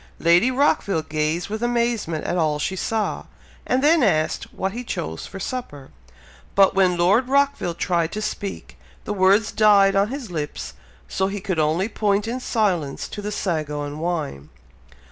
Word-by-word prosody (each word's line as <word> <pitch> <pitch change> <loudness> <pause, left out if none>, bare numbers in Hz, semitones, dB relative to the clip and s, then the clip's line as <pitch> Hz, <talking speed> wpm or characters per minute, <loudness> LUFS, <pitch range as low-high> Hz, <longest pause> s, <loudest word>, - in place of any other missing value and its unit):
Lady 170 +8 +4
Rockville 250 - +1
gazed 155 +3 -1
with 215 +2 -4
amazement 235 -9 -1
at 175 - -1
all 155 -4 +1
she 190 +5 -2
saw, 220 +3 -2 0.4
and 255 +2 +1
then 315 +2 +5
asked 155 -9 +1
what 190 - -3
he 240 +4 -6
chose 80 - -5
for 195 - -9
supper; 145 - -6 0.6
but 195 -1 +5
when 185 -2 +3
Lord 200 +9 +3
Rockville 280 -10 +1
tried 170 -2 0
to 215 - -3
speak, 200 -2 -5 0.3
the 210 - -2
words 200 +3 +3
died 200 -2 +5
on 200 +1 +3
his 255 -4 -6
lips, 150 -3 -5 0.3
so 190 - -1
he 200 +1 -4
could 185 -4 -2
only 160 +6 +1
point 205 -1 0
in 245 +3 -3
silence 185 - -1
to 205 - -6
the 210 +1 -4
sago 155 -7 -2
and 145 +1 -6
wine. 155 - -3
195 Hz, 165 wpm, -22 LUFS, 160-220 Hz, 0.6 s, then